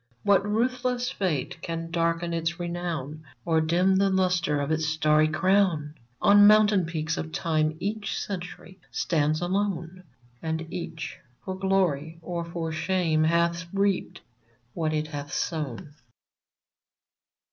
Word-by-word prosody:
What 200 -1 +4
ruthless 245 +3 0
fate 160 - -2
can 165 0 -4
darken 170 0 0
its 165 +1 -2
renown, 170 -4 -4 0.2
Or 160 -1 +3
dim 180 +4 +3
the 195 0 +3
lustre 180 -5 +1
of 140 +2 -2
its 155 0 0
starry 155 -1 +3
crown? 165 -2 +2 0.3
On 205 0 +7
mountain 210 -4 +5
peaks 165 -1 -2
of 160 - -4
Time 155 -2 0
each 205 +2 -3
Century 185 -1 -6
stands 155 -1 0
alone; 185 -1 -2 0.4
And 160 0 -2
each, 165 -3 -6 0.3
for 190 - -3
glory 185 -5 0
or 170 0 -3
for 170 -1 -4
shame, 160 -1 +1
hath 170 +1 +1
reaped 200 -1 0 0.5
what 160 -2 -1
it 155 0 -1
hath 145 -2 -6
sown 150 -3 -3
170 Hz, 125 wpm, -26 LUFS, 155-190 Hz, 0.5 s, On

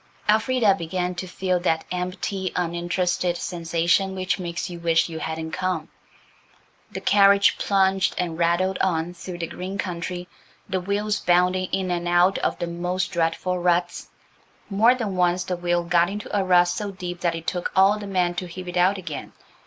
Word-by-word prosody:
Elfrida 220 0 +3
began 180 0 -2
to 180 +1 -6
feel 185 0 -1
that 160 -2 0
empty, 185 +1 -3
uninterested 175 0 -1
sensation 170 +3 0
which 185 +1 -1
makes 170 -1 -4
you 175 -2 -7
wish 165 0 +2
you 160 -1 -6
hadn't 160 0 -4
come. 185 +1 -2 1.0
The - - -6
carriage 200 0 +5
plunged 190 -2 +2
and 175 -3 -2
rattled 175 +3 +1
on 175 -2 0
through 180 +1 -8
the 170 - -3
green 185 +4 -6
country, 180 -1 -4 0.4
the 190 -2 -1
wheels 205 +2 -1
bounding 180 +1 +2
in 190 -1 -1
and 175 0 -2
out 175 +2 +3
of - - -1
the - - -2
most 175 +2 -2
dreadful 170 +2 0
ruts. 175 0 0 0.6
More 225 +6 +5
than 215 -6 -3
once 180 0 +2
the 180 - -2
wheel 175 0 0
got 170 0 +3
into 205 +1 -5
a 200 - +2
rut 180 -1 +4
so 205 +3 -3
deep 180 -2 -6
that 170 -2 +1
it 165 0 -7
took 180 -1 -2
all 195 +2 +5
the 205 - -7
men 180 -2 +1
to 180 - -7
heave 180 +1 -8
it 180 0 -4
out 185 +3 +3
again. 165 -6 -7
180 Hz, 175 wpm, -24 LUFS, 175-190 Hz, 1.0 s, carriage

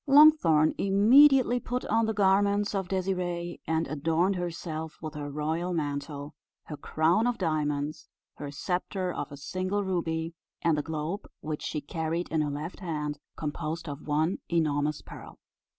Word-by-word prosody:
Longthorn 275 - +6
immediately 245 +6 +6
put 250 +1 -3
on 225 +1 +2
the 220 - 0
garments 200 +1 +3
of 195 -2 -1
Désirée, 180 -2 -2
and 160 0 +1
adorned 165 +6 +1
herself 165 -3 -4
with 155 -1 -6
her 145 -1 -5
royal 160 +5 -2
mantle, 145 -1 -3 0.3
her 150 - -7
crown 165 +10 +2
of 245 - 0
diamonds, 150 -3 -1 0.3
her 145 - -5
sceptre 180 +4 -2
of 145 - -5
a 145 - -8
single 185 +7 -2
ruby, 165 -3 -2 0.3
and 165 -2 +3
the 150 - 0
globe 160 +5 -4
which 155 -1 -4
she 150 - -3
carried 160 +3 -3
in 155 0 +1
her 150 - 0
left 150 +5 -5
hand, 150 -5 -3 0.2
composed 160 +2 -4
of 145 +1 -7
one 155 +5 +1
enormous 150 -3 0
pearl. - - -11
165 Hz, 150 wpm, -28 LUFS, 150-190 Hz, 0.3 s, Longthorn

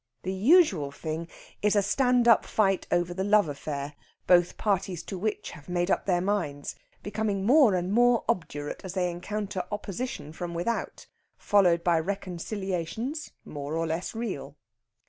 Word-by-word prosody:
The 185 - -2
usual 195 - +4
thing 160 +3 -5 0.3
is 210 0 +3
a 205 - +4
stand 245 +3 +2
up 230 - +6
fight 195 -3 +1
over 175 0 +1
the 190 +2 -2
love 205 -2 +4
affair, 145 0 -5 0.3
both 175 -1 +4
parties 195 -4 -1
to - - -6
which 210 +3 -3
have 150 +3 -13
made 175 +1 0
up - - 0
their 175 -2 +2
minds 175 -8 -2 0.3
becoming 205 -1 -2
more 255 -4 +6
and 180 +2 -1
more 240 +1 +4
obdurate 155 -9 -2
as 190 -1 -6
they 180 -2 +1
encounter 195 +2 -4
opposition 205 - -5
from 170 +1 -5
without 225 +8 -3 0.3
followed 180 -5 +3
by 170 -2 +3
reconciliations 195 - -4 0.2
more 145 +1 -5
or 165 - 0
less 165 +6 -3
real. 185 -12 -4
190 Hz, 155 wpm, -28 LUFS, 170-210 Hz, 0.3 s, up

